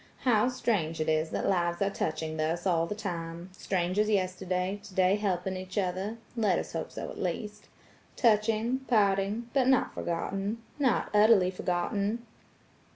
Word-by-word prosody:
How 240 -1 +3
strange 200 -11 -1
it 155 - -1
is 155 0 +1
that - - -2
lives 175 -2 +1
are 200 0 +1
touching 155 -3 -2
thus 160 +3 -1
all 170 -3 +2
the 210 - -4
time–strangers 180 +1 -2
yesterday, 185 -1 -1
today 190 -2 +2
helping 190 -2 -1
each 185 +2 -7
other–let 205 +2 -1
us - - -4
hope 165 -1 -4
so - - -5
at - - -9
least–touching–parting–but 220 +3 0
not 265 -1 +3
forgotten–not 205 - -2
utterly 210 -3 +5
forgotten." 200 +5 -1
195 Hz, 120 wpm, -29 LUFS, 175-215 Hz, -, utterly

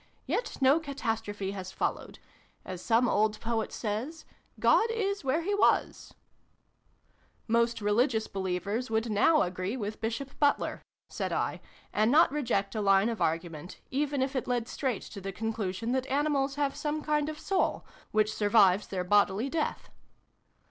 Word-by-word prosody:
Yet - - -2
no 270 +4 +5
catastrophe 225 -9 -3
has 190 -2 -6
followed. - - -3 0.5
As 185 -1 -6
some 235 +1 +3
old 215 0 +1
poet 225 -1 -2
says, 245 +9 -4 0.2
' - - -27
God 455 - +5
is 400 -5 -1
where 285 +5 0
he 405 +4 -1
was' 410 - +1 0.3
' - - -42
" - - -39 0.3
Most 235 0 +1
religious 220 +2 +2
believers 195 +5 -3
would 220 +1 0
now 300 +10 +4
agree 185 +6 -3
with 215 -2 -5
Bishop 230 +5 -3
Butler," 285 -1 +1 0.3
said - - -3
I, - - -1 0.3
"and 215 +2 +3
not 310 -1 +6
reject 240 -9 -1
a 215 - -2
line 195 +2 +4
of 225 -5 -4
argument, 165 +1 -2
even 280 0 0
if 270 +1 -3
it 260 - -2
led 240 -2 -1
straight 255 -5 -2
to 200 - -9
the 195 +1 -4
conclusion 220 +1 -3
that 260 0 0
animals 280 -1 +1
have 285 -1 0
some 300 0 -3
kind 300 0 +1
of 310 - -6
soul, 385 +4 0 0.2
which 215 0 +1
survives 205 -2 +4
their 185 -2 -3
bodily 205 +5 +2
death." 315 -2 -2
230 Hz, 160 wpm, -29 LUFS, 205-280 Hz, 0.5 s, not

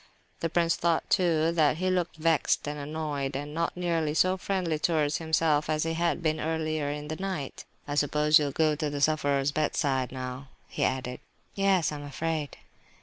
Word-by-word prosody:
The 165 - -1
prince 170 0 +2
thought, 170 -1 0
too, 165 -4 +3
that 155 -2 +3
he 185 +2 0
looked 180 -2 -1
vexed 160 -2 +1
and 150 0 -4
annoyed, 145 -2 -3
and 145 +2 -4
not 170 +2 -2
nearly 165 -4 0
so 185 +3 +3
friendly 180 -4 -1
towards 150 -2 +1
himself 160 -2 +1
as 155 0 +1
he 165 0 -1
had 170 +1 0
been 155 -1 +1
earlier 155 -2 -1
in 150 0 -4
the 155 +1 -4
night. 185 -8 -4 0.2
"I 145 - -3
suppose 150 +1 +4
you 150 - 0
will 140 - -2
go 155 +1 +2
to 150 0 -2
the 145 0 -4
sufferer's 145 -2 +2
bedside 140 -3 0
now?" 130 +1 -6 0.2
he - - -3
added. 125 -1 -1 0.3
"Yes, 195 -5 +2
I 150 - -4
am 145 - -8
afraid..." 150 +1 -3
155 Hz, 190 wpm, -28 LUFS, 145-165 Hz, 0.3 s, suppose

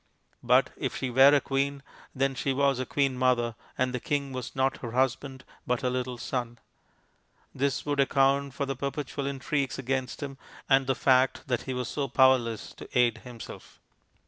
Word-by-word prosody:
But - - +3
if - - -3
she 130 - -3
were 135 +3 +7
a - - +5
queen, 140 0 -2 0.3
then 135 0 +1
she 135 +1 -1
was 140 -1 +2
a 130 - -3
queen 140 -2 +1
mother, 125 -2 +2 0.2
and 130 0 0
the 125 - -1
king 140 +1 -2
was 125 -1 -6
not 135 0 +1
her 115 -2 -7
husband 130 +1 -1 0.2
but 125 +1 0
her 125 -1 0
little 125 -1 -3
son. 120 -1 -4 1.0
This 140 -1 -1
would 145 -1 -1
account 140 0 +2
for 140 - -1
the 135 0 -3
perpetual 140 +1 -4
intrigues 140 0 -2
against 130 +1 -3
him, 135 -1 -7 0.3
and 135 -1 +4
the 135 - +2
fact 130 0 +2
that 120 -2 0
he 130 - -1
was 125 -1 -2
so 140 -2 -2
powerless 130 -4 +2
to - - -10
aid 120 -2 +3
himself. 120 -2 -11
130 Hz, 180 wpm, -28 LUFS, 125-140 Hz, 1.0 s, were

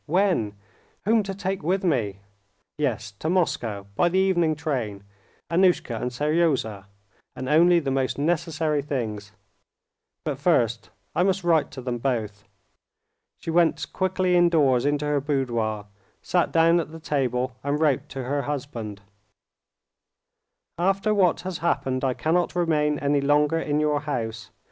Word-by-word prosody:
When? 170 - +1 0.5
Whom 220 +2 +4
to 195 -1 -5
take 195 -1 -3
with 185 +5 0
me? 110 - 0 0.5
Yes, 125 -9 -2
to 160 - -2
Moscow 115 - 0
by 175 - +3
the 185 - 0
evening 175 -5 +2
train. 120 -10 -3 0.4
Annushka 170 -10 +2
and 125 - -1
Seryozha, 140 - 0 0.5
and 130 - -5
only 170 +4 +5
the 140 -4 -2
most 135 -1 0
necessary 155 -1 0
things. 110 -7 -4 0.9
But 145 -4 -3
first 120 -8 +1 0.3
I - - +2
must 190 0 +1
write 160 -4 +3
to 135 - -8
them 120 -1 -3
both." 110 -6 -2 0.9
She 165 - -5
went 170 0 +1
quickly 185 -1 +1
indoors 150 -7 +4
into 145 0 0
her 145 -1 +1
boudoir, 120 -7 -1 0.4
sat 175 -1 +1
down 165 +1 +4
at 160 - -4
the 165 - -9
table, 130 -5 -1
and 140 +1 -1
wrote 150 -5 +1
to 135 -1 -5
her 140 +3 -1
husband:—"After 125 - -6
what 185 -5 +3
has 185 -2 -5
happened, 140 -5 -1
I 130 -2 +1
cannot 175 +3 0
remain 150 -4 +1
any 140 0 +1
longer 150 +3 +2
in 150 -2 0
your 150 -1 +1
house. 115 -6 -4
145 Hz, 140 wpm, -25 LUFS, 125-170 Hz, 0.9 s, only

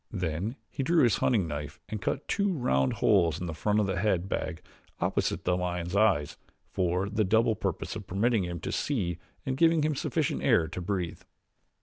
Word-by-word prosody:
Then 90 - -2
he 140 - -5
drew 165 +3 +3
his 120 -4 +4
hunting 105 -9 +2
knife 75 +1 -5
and 110 -2 -5
cut - - -2
two 200 -2 +1
round 65 - +1
holes 85 -6 +3
in 90 - -4
the 80 - -4
front 105 +6 +1
of 105 - +2
the 95 -3 -1
head 95 -3 +1
bag 80 - -3 0.4
opposite - - 0
the 90 - +2
lion's 90 0 -2
eyes 100 -9 +2 0.3
for 90 +2 0
the 105 +1 0
double 110 +3 +3
purpose - - -3
of 105 -3 -7
permitting 110 +2 +1
him 85 -1 -4
to - - -3
see 90 - -1 0.3
and 130 - -1
giving 165 0 +4
him 155 0 +1
sufficient 135 - -1
air 80 - +3
to 90 - -6
breathe. 90 -2 -3
95 Hz, 195 wpm, -29 LUFS, 85-115 Hz, 0.4 s, his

